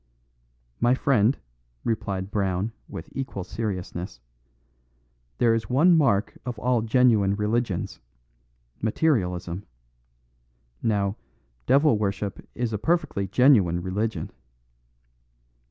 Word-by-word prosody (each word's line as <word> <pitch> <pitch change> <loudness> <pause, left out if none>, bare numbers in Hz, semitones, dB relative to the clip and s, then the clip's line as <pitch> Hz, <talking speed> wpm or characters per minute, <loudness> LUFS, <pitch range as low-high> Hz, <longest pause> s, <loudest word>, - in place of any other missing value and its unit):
"My 120 +1 +4
friend," 130 -2 +3 0.5
replied 100 -4 -2
Brown, 95 +1 0 0.2
with 80 - -7
equal 130 -8 -4
seriousness, 90 - -5 1.2
"there 115 -1 +4
is 115 0 -2
one 160 +8 +5
mark 120 -10 +2
of 125 -2 -5
all 120 +2 +1
genuine 110 -4 +3
religions: 105 -1 -1 0.8
materialism. 95 - 0 1.2
Now, 100 -2 0 0.5
devil 140 -5 +4
worship 100 -1 -2
is 120 -2 -2
a 105 - -1
perfectly 150 - 0
genuine 100 -7 +4
religion." 95 -2 -2
110 Hz, 90 wpm, -25 LUFS, 95-125 Hz, 1.2 s, one